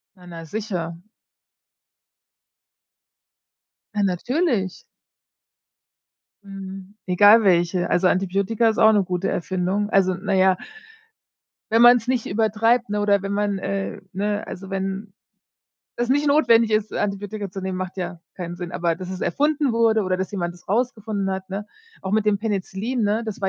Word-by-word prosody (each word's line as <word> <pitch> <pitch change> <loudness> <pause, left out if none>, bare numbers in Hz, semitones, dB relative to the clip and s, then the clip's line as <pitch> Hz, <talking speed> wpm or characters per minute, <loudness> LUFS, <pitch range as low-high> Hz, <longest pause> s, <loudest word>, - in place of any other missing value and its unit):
Ja, 180 -2 -17
na 165 -1 -9
sicher. 170 -3 -4 2.9
Ja, 205 - +1
natürlich. 200 - -1 1.6
Mhm, 195 0 -9
egal 205 +5 +6
welche. 175 -1 +2
Also, 180 +1 +3
Antibiotika 195 +5 +1
ist 220 - -2
auch 220 -1 +7
'ne 205 -2 +3
gute 180 0 -2
Erfindung, 185 +3 -1
also, 185 -3 +3
na 200 0 -2
ja 190 0 +4 1.2
wenn 225 +1 +4
man's 240 0 +6
nicht 255 -3 0
übertreibt, 225 +3 +1
ne, 210 0 -1
oder 205 -1 +2
wenn 195 0 -4
man, 205 0 0
äh 195 0 -4
ne, 205 +2 -2
also, 190 +1 -8
wenn 195 +1 -4 0.8
es 240 0 -1
nicht 290 +3 +2
notwendig 235 -6 +4
ist, 215 0 0
Antibiotika 205 0 -3
zu 195 - -6
nehmen, 190 0 -3
macht 185 0 -5
ja 180 -2 -5 0.2
keinen 175 -2 -5
Sinn. 175 -1 -6
Aber 170 -2 0
dass 185 +2 -8
es 190 0 -6
erfunden 290 -2 +1
wurde 225 -1 +3
oder 185 0 0
dass 190 0 -3
jemand 175 -4 -3
das 175 - -20
rausgefunden 215 -2 -1
hat, 190 0 -4
ne? 200 +2 -4 0.4
Auch 190 - -4
mit 215 0 +2
dem 210 -1 +2
Penicillin, 215 +3 -2
ne, 210 +2 +1
das 220 - -5
war 195 - +1
200 Hz, 155 wpm, -22 LUFS, 185-220 Hz, 2.9 s, auch